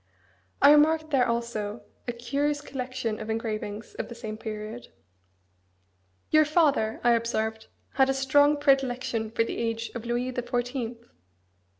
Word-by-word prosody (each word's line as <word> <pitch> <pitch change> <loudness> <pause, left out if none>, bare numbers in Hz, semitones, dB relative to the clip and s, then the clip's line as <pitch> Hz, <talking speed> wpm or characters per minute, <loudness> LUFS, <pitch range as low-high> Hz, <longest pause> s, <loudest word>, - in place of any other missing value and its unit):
I 285 - +9
remarked 310 +1 +4
there 255 -3 +3
also 235 -2 -3 0.2
a - - 0
curious 280 +5 -1
collection 255 -5 -4
of 215 - -6
engravings 220 -1 -4
of - - -3
the 235 - -8
same 215 -2 -6
period. 215 +1 -6 1.4
"Your 310 0 +7
father," 295 -8 +2
I 240 - +5
observed, 220 -1 -1 0.3
"had 265 0 +4
a - - +3
strong 285 +2 +4
predilection 255 -5 +1
for 230 +1 +1
the - - -4
age 230 0 -2
of 235 - -6
Louis 240 +2 -1
the 250 - -2
Fourteenth." 245 -1 -3
240 Hz, 140 wpm, -27 LUFS, 225-270 Hz, 1.4 s, I